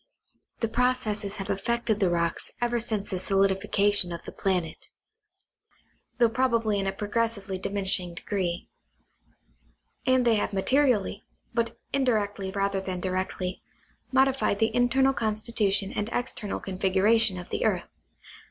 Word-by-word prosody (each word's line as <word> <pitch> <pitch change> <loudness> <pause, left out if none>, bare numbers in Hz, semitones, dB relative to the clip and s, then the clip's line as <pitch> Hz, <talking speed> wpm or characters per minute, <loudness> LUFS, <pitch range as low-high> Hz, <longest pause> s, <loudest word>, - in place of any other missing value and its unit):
The 230 - +2
processes 220 -4 0
have 195 -2 -4
affected 230 +2 0
the 190 -4 +3
rocks 170 -1 -1
ever 240 0 +1
since 215 -3 -3
the 185 - -1
solidification 195 0 +2
of 170 - -6
the - - -7
planet, 180 -5 -2 1.3
though 240 -2 +5
prob 245 +1 +1
ably 215 -3 +1
in 195 - -1
a - - +1
progressively 205 -1 -2
diminishing 190 -3 +1
degree; 175 -2 -2 1.4
and 255 -1 +4
they 230 -2 +4
have 205 - -1
ma 195 - 0
terially 250 -6 +2 0.3
(but 230 -1 -1 0.2
indirectly 210 -7 0
rather 195 0 -1
than 185 -1 -4
directly) 185 0 -3 0.5
modified 265 -5 +3
the 220 +2 +1
internal 265 +2 +3
constitution 215 -3 0
and 210 +2 -1
external 225 -5 -3
configuration 195 +2 +2
of 180 0 -9
the - - -1
earth. - - +1
205 Hz, 135 wpm, -27 LUFS, 190-235 Hz, 1.4 s, though